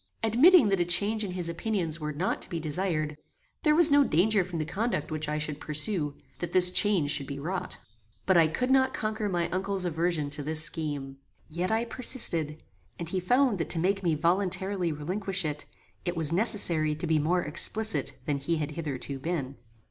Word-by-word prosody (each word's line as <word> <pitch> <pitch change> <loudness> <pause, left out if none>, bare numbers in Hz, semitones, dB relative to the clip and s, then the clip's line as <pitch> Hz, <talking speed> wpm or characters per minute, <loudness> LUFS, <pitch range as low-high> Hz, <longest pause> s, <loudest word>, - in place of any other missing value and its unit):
Admitting 250 - +5
that 195 -2 +1
a - - +3
change 205 +6 +2
in 190 -3 -5
his 180 -2 -2
opinions 170 -2 -2
were 150 -1 -4
not 165 +6 -2
to - - -5
be 170 - -4
desired, 155 -1 -2 0.5
there 300 -1 +3
was 330 -2 +7
no 285 0 +6
danger 200 - +2
from 175 -1 -6
the 155 - -2
conduct 195 -4 -3
which 155 -1 -3
I 150 - -2
should 150 -1 -4
pursue, 150 -1 -2 0.2
that 175 -1 -5
this 180 -1 +5
change 180 -8 +2
should 140 -3 -2
be 140 - -6
wrought. 175 +6 -4 0.5
But 190 - +3
I 165 -2 +5
could 250 +12 -2
not 260 -1 +3
conquer 215 -1 -3
my 175 -2 -1
uncle's 190 0 -2
aversion 165 -3 -1
to 145 +1 -3
this 155 +2 +3
scheme. 145 -4 -3 0.3
Yet 175 +5 -3
I 225 +1 0
persisted, 170 - 0 0.3
and 170 -1 -5
he 185 - -1
found 245 +3 +1
that 165 - -3
to - - +4
make 195 +4 0
me 170 -4 0
voluntarily 185 +2 0
relinquish 185 +5 -2
it, 150 -1 -4 0.4
it 175 -1 -3
was 160 -1 +2
necessary 170 -6 +2
to 155 - -5
be 160 -2 +1
more 175 +4 0
explicit 215 +8 +2
than 145 -3 -1
he 165 +5 -1
had 150 -1 -3
hitherto 140 -3 -5
been. 140 -3 -4
175 Hz, 195 wpm, -27 LUFS, 155-200 Hz, 0.5 s, was